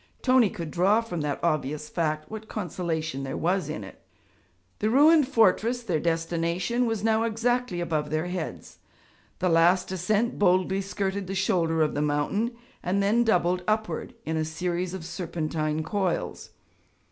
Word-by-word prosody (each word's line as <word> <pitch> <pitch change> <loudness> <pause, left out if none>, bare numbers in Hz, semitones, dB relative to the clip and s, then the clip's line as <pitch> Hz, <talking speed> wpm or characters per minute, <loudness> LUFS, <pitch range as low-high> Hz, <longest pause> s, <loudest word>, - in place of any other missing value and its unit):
Tony 255 -4 +5
could 170 -7 -6
draw 195 +5 +3
from 200 -8 -4
that 145 -1 -2
obvious 150 -2 -1
fact 155 -2 -1
what 220 0 -8
consolation 165 -8 -3
there 135 -1 -4
was 175 -2 0
in 105 -8 -4
it. 95 - -12 0.8
The 215 - +1
ruined 295 +3 +6
fortress, 235 0 +2
their 175 -8 0
destination, 170 +8 0
was 225 -3 -2
now 220 0 +3
exactly 230 -3 0
above 155 -3 -1
their 155 +2 -1
heads. 170 - -6 0.6
The 180 - +1
last 175 +3 +4
ascent 210 +6 0
boldly 190 0 +3
skirted 195 0 -3
the 195 - -4
shoulder 165 -4 +2
of 150 - 0
the 145 - -1
mountain, 150 +11 0 0.3
and 195 +3 0
then 220 +4 +3
doubled 180 -4 +2
upward 215 -6 -1
in 160 0 -1
a 160 - +1
series 175 +3 -2
of 175 -4 -7
serpentine 160 -3 -2
coils. 190 -2 -2
180 Hz, 155 wpm, -26 LUFS, 160-215 Hz, 0.8 s, ruined